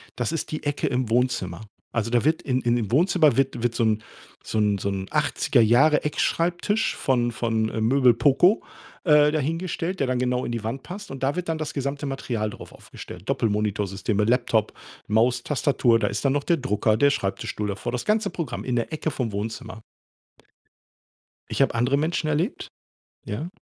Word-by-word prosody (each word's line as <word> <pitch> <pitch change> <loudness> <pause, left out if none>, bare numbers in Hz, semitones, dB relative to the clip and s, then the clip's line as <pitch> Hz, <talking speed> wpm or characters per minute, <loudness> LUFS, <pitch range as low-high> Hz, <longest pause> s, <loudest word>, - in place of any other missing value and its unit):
Das 120 +5 -2
ist 165 - -3
die 155 - -4
Ecke 145 -1 -1
im 125 -2 -1
Wohnzimmer. 115 -7 0 0.3
Also, 115 0 -1
da 120 -1 +2
wird 160 +1 +2
in 130 -2 0
im 120 0 +2
im 110 -2 -3
Wohnzimmer 155 -2 +4
wird 130 -3 0
wird 120 -1 0
so 115 - +1
'n 110 -1 +1 0.4
so 110 - -2
'n 105 -1 +2
so 100 - -2
'n 95 -1 -4
80er 145 -4 +2
Jahre 135 +7 +4
Eckschreibtisch 175 +7 0
von 120 -3 +1
von, 110 -1 -1
äh, 110 - -3
Möbel 125 +1 +4
Poco, 140 - +4 0.4
äh, 150 -3 +5
dahingestellt, 165 +4 -2
der 135 - +1
dann 130 -1 0
genau 125 0 0
in - - -3
die 115 -2 -3
Wand 125 +4 -4
passt. 200 +3 -8
Und 135 0 -7
da 140 +4 +1
wird 180 -1 -3
dann 160 - 0
das 155 -1 -4
gesamte 140 +1 -3
Material 120 -5 -2
drauf - - -11
aufgestellt, - - -11
Doppelmonitorsysteme, 105 -1 0
Laptop, 115 -2 +1 0.3
Maus, 120 +3 +2
Tastatur. 135 -5 +2
Da 105 - +1
ist 100 +5 -3
dann 135 - +3
noch 145 0 0
der 170 - +2
Drucker, 110 -4 +1
der 140 +3 +5
Schreibtischstuhl 105 -2 -2
davor, 110 +5 -4
das 125 - -3
ganze 215 +1 +1
Programm, 165 -4 -5
in 125 -2 -2
der 120 +7 -2
Ecke 155 0 -2
vom 120 -6 -3
Wohnzimmer. 110 +2 -5 1.7
Ich - - +1
habe - - +2
andere 125 +4 +2
Menschen 155 +1 -1
erlebt 165 - -1 0.6
Ja. 120 +10 -4
125 Hz, 190 wpm, -24 LUFS, 110-150 Hz, 1.7 s, äh